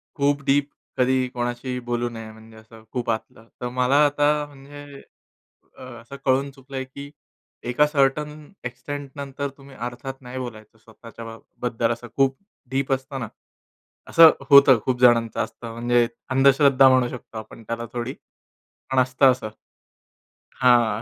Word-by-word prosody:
खूप 140 -1 +1
डीप 140 +1 +2 0.3
कधी 130 0 +2
कोणाशीही 120 +1 -3
बोलू 120 0 -1
नये. 115 -1 -9
म्हणजे 110 0 -16
असं 110 0 -16
खूप 125 -2 -3
आतलं. 110 0 -6
तर 125 - -2
मला 125 +3 +2
आता 145 +1 +2
म्हणजे 145 0 -12 0.8
अ, - - -11
असं 120 +1 -10
कळून 135 +1 +2
चुकलंय, 135 0 -7
की 140 +2 -10 0.6
एका 150 +5 +4
सर्टेन 150 +2 -1
एक्सटेंटनंतर 140 +2 -6
तुम्ही 135 -1 -15
अर्थात, 125 +2 -6
नाही 125 +1 -8
बोलायचं 110 -3 -9
स्वतःच्या 115 +1 -13
बा 115 0 -8 0.2
बद्दल 120 -1 0
असं 120 +1 -5
खूप 135 -1 +3 0.4
डीप 135 0 -1
असतना. 130 -3 -4 0.8
असं 165 -1 +8 0.2
होतं 140 -3 +8
खूप 125 -1 -1
जणांचं 115 -2 +4
असतं. 115 -1 -10
म्हणजे 120 0 +2 0.2
अंधश्रद्धा 135 0 +5
म्हणू 130 -1 +3
शकतो 115 -2 -9
आपण 110 +1 -11
त्याला 115 +1 -4
थोडी, 120 +3 -4 0.8
पण 130 - +1
असतं 130 +1 +4
असं 120 -4 -6 1.1
हां, 120 -4 +4
130 Hz, 140 wpm, -23 LUFS, 120-140 Hz, 1.1 s, असं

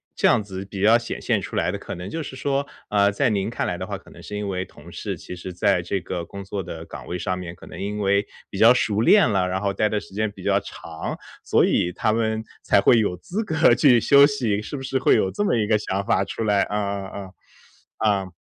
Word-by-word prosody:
这 - - +3
样 115 - +4
子 95 -2 -7
比 95 0 -7
较 110 +3 +6
显 120 0 -6
现 - - +1
出 - - -7
来 - - +1
的， - - -3
可 - - -7
能 90 +2 -7
就 165 0 -4
是 135 - -8
说， 140 0 -1 0.2
呃， 100 -1 +3
在 125 +6 +1
您 100 -3 0
看 - - -2
来 - - -2
的 - - -4
话， - - -5
可 - - -18
能 - - -14
是 105 - -6
因 105 - -3
为 95 -1 -2
同 95 - -15
事 - - -5
其 90 - -9
实 90 +1 -7
在 90 0 +2
这 95 +3 -2
个 90 0 -5
工 100 +3 -9
作 95 0 -4
的 80 -1 -8
岗 - - -9
位 90 - -4
上 90 +1 -2
面， 85 -2 -6
可 - - -14
能 - - -10
因 105 +1 -3
为， 100 0 +2 0.2
比 100 - -7
较 115 +4 +7
熟 110 -4 0
练 190 - +5
了， 95 -3 +1
然 95 - -1
后 100 0 -1
待 105 +2 +1
的 105 -1 0
时 - - -14
间 110 +1 -1
比 - - -13
较 - - +2
长， 80 -1 -7 0.3
所 - - +3
以 85 - +1
他 110 +4 0
们， 110 -1 0 0.2
才 - - +4
会 115 +4 +5
有 90 -4 0
资 200 - -4
格 160 -5 +4
去 125 -6 +5
休 140 +4 +7
息， 120 -8 0
是 145 - -6
不 135 - -7
是 135 0 -1
会 130 - +4
有 95 -4 +2
这 205 - -1
么 195 - +2
一 105 -2 0
个 110 - +3
想 100 -1 -3
法 115 - +2
出 115 - -4
来？ 100 -2 +3
啊 105 - -1
啊 100 -1 -4
啊。 95 -2 -9 0.9
啊。 95 -1 -9
105 Hz, 285 characters per minute, -23 LUFS, 95-115 Hz, 0.9 s, 较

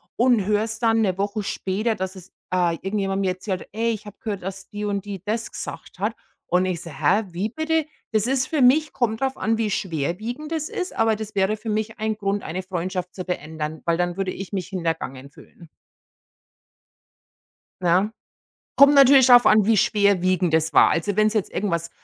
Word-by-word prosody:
und 240 -4 +3
höre 210 0 +2
es 220 0 -4
dann 225 -1 +2
'ne 190 -3 0
Woche 205 +1 -2
später, 205 +4 -1
dass 190 +1 -4
es, 185 0 -12 0.2
äh, 175 -2 +2
irgendjemand 195 0 -1
mir 185 -1 +1
erzählt: 185 0 -5
„Hey, 230 +1 0
ich 215 -2 -6
habe 205 - -11
gehört, 205 -3 -4
dass 195 +1 -7
die 210 -1 -5
und 200 -1 -2
die 195 -3 -7
das 225 +2 -3
gesagt - - -8
hat." - - -1 0.3
Und 180 +1 +2
ich 175 -3 -2
so: 170 - -8
„Hä? 155 +9 +2
Wie 190 +6 -2
bitte?" 315 +4 0 0.3
Das 215 -1 +2
ist 260 0 +1
für 305 -4 0
mich 300 +5 +4
kommt 235 -2 -1
darauf 265 0 -1
an, 225 0 0
wie 225 -2 0
schwerwiegend 200 - -3
das 315 -1 -1
ist, 365 0 -4
aber 225 -1 +2
das 215 0 -7
wäre 195 +2 +1
für 220 +2 -7
mich 215 0 -2
ein 220 0 -1
Grund, 200 -1 -1
eine 180 +4 -4
Freundschaft 180 0 -4
zu 185 - -6
beenden, 155 -2 -5
weil 170 -1 +1
dann 175 +1 -1
würde 190 -1 -1
ich 195 +1 -8
mich 190 -3 -3
hintergangen 165 -7 -4
fühlen. 170 +2 -17 2.1
Ja. 180 +5 +2 0.7
Kommt 280 +1 +7
natürlich 275 -2 +7
darauf 245 -2 +7
an, 215 -1 +6
wie 225 -1 +4
schwerwiegend 185 -4 +2
das 160 0 +2
war. - - +6
Also, 195 +4 0
wenn 215 0 +4
sie 220 - +1
jetzt 200 - -5
irgendwas 170 -4 -2
200 Hz, 200 wpm, -23 LUFS, 180-225 Hz, 2.1 s, Kommt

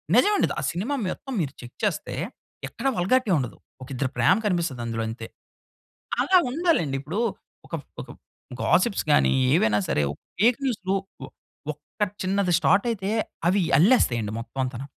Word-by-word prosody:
నిజం 255 - +5
అండి. - - +3
ద - - -1
ఆ - - -6
సినిమా 200 - -2 0.2
మొత్తం 270 +7 -6
మీరు 140 -3 -3
చెక్ 120 -1 -11
చేస్తే, - - -1 0.5
ఎక్కడ 235 - -4
వల్‌గారి‌టి 215 +5 +2
ఉండదు. 125 -5 -3 0.2
ఒక 130 - -8
ఇద్దరి 130 +1 -1
ప్రేమ 185 - +5
కనిపిస్తది 170 -10 0
అందులో 115 -1 -2
అంతే. 115 0 -7 0.9
అలా 380 - +5
ఉండాలండి. 275 - +1
ఇప్పుడు 160 +9 -4 0.5
ఒక - - -20 0.3
ఒక - - -12 0.5
గాసిప్స్ 230 -5 +2
గాని, - - +4 0.2
ఏవైనా 110 -10 +3
సరే - - +1 0.4
ఫేక్ 235 +6 +4
న్యూస్‌లు, 195 -7 -1 0.3
ఒ - - -4 0.5
ఒక్క 150 +7 -20 0.2
చిన్నది 190 -1 +1
స్టార్ట్ 200 +4 +3
అయితే, 200 -2 -3 0.4
అవి 190 +3 +3 0.2
అల్లేస్తాయండి 125 - +3
మొత్తం 125 +3 -8
అంతాను. 130 +1 -4
180 Hz, 150 wpm, -25 LUFS, -, 0.9 s, నిజం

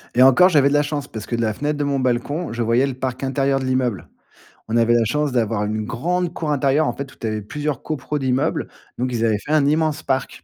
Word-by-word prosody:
Et 125 - +4
encore 135 +8 +7
j'avais 145 -6 +4
de 140 - +1
la 145 - +4
chance 145 -1 -3
parce 110 - -7
que 120 - -3
de - - -1
la 110 -2 0
fenêtre 145 +6 -2
de 145 - -1
mon 140 -1 0
balcon, 130 +6 -1
je 120 +1 -3
voyais 115 +4 +3
le 135 - -3
parc 130 0 -4
intérieur 135 0 +1
de 130 - -4
l'immeuble. 130 -6 -1 0.6
On 110 - -2
avait 115 0 +4
la 115 - +3
chance 150 +4 0
d'avoir 110 -3 0
une 110 +1 -2
grande 175 +10 -1
cour 155 -3 -3
intérieure 145 +1 +2
en 120 - -1
fait 140 +1 -7
où - - -20
tu 115 - -5
avais 110 -1 -2
plusieurs 145 +4 -4
copropriétés 150 0 -3
d'immeubles, 130 -1 0 0.3
donc 125 +1 -1
ils 115 -1 -1
avaient 110 -2 +2
fait 125 - -7
un 155 -2 +4
immense 155 0 +1
parc. 135 -3 -2
135 Hz, 260 wpm, -21 LUFS, 120-145 Hz, 0.6 s, encore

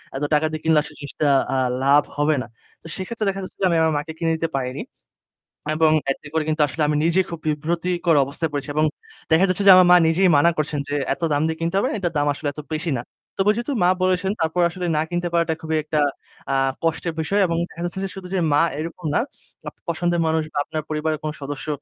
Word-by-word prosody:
এত 135 - -3
টাকা 150 +1 +3
দিয়ে 155 0 -5
কিনলে 160 -1 +4
আসলে - - -10
জিনিসটা 145 +1 -2 0.3
আ - - +1 0.3
লাভ 140 +2 +5
হবে 150 +1 +2
না। - - -7 0.3
তো - - -12
সেক্ষেত্রে 215 +3 -4
দেখা 195 0 -3
যাচ্ছে 185 - -10
যে - - +3
আমি 170 - +2
আমার 160 -1 +2
মাকে 150 +2 -4
কিনে 165 -1 0
দিতে 165 0 -2
পারিনি। 130 -1 -3 0.9
এবং 155 0 +4 0.2
এতে 150 - -6
করে 160 -1 +1
কিন্তু 155 0 0
আসলে 155 +4 -5
আমি 150 - +1
নিজেই 180 +2 +2
খুব 170 - -6
বিব্রতকর 170 +3 0
অবস্থায় 155 +4 -3
পড়েছি 145 0 -4
এবং 155 +1 +3 0.5
দেখা 170 +4 +5
যাচ্ছে 185 +2 0
যে - - +11
আমার 185 -1 +7
মা 180 - +9
নিজেই 180 +4 +3
মানা 170 +4 +5
করছেন 150 -1 -1
যে, 145 - -1 0.2
"এত - - -11
দাম 145 - +1
দিয়ে 160 0 -3
কিনতে 165 +2 -1
হবে - - +2
না।" - - -3
এটার 175 -3 -2
দাম 145 0 +1
আসলে 145 +1 -5
এত 150 - -9
বেশি 155 +1 -2
না। 120 - -5 0.4
তবে 200 +2 +4
যেহেতু 240 +4 -3
মা 175 - +5
বলেছেন 185 +1 +1
তারপর 160 +2 +1
আসলে 180 +1 -5
না - - +2
কিনতে 175 0 -1
পারাটা 170 -1 +2
খুবই 160 0 -1
একটা 150 0 -1 0.5
আ - - +2 0.3
কষ্টের 165 0 -1
বিষয় 200 +6 +1
এবং 165 -1 -1
দেখা 170 - -10
যাচ্ছে 175 +2 -4
যে 195 - -2
শুধু 190 -2 -8
যে 190 - +1
মা 145 - +5 0.2
এরকম 165 +2 -6
না, - - +4 0.5
আপনার - - -29
পছন্দের 175 0 0
মানুষ 160 0 +1
বা - - -4
আপনার 155 -1 -4
পরিবারের 155 0 -1
কোন 155 - -2
সদস্য 145 +2 -5
160 Hz, 235 wpm, -22 LUFS, 150-175 Hz, 0.9 s, যে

